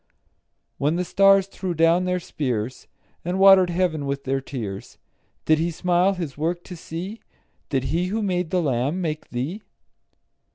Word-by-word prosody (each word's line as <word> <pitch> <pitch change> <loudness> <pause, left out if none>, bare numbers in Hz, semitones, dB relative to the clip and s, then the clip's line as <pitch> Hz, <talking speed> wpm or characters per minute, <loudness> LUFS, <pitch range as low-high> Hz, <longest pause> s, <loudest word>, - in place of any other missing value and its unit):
When 150 +4 +1
the 180 +1 -1
stars 195 +1 +5
threw 190 -2 -5
down 165 +3 +3
their 180 0 0
spears, 130 -8 -3 0.4
And 180 +2 -2
water'd 190 -2 +7
heaven 170 -5 0
with 140 0 -3
their 135 0 -1
tears, 110 -8 -6 0.5
Did 155 0 +4
He 165 +2 +1
smile 180 +3 +1
His 165 -7 -5
work 170 +3 -2
to 180 - -9
see? 175 +6 -7 0.5
Did 135 -3 0
He 170 +6 0
who 215 +3 -2
made 180 -4 -1
the 180 0 +1
lamb 135 +4 0
make 155 -4 -3
thee? 140 - -4
170 Hz, 160 wpm, -23 LUFS, 140-185 Hz, 0.5 s, water'd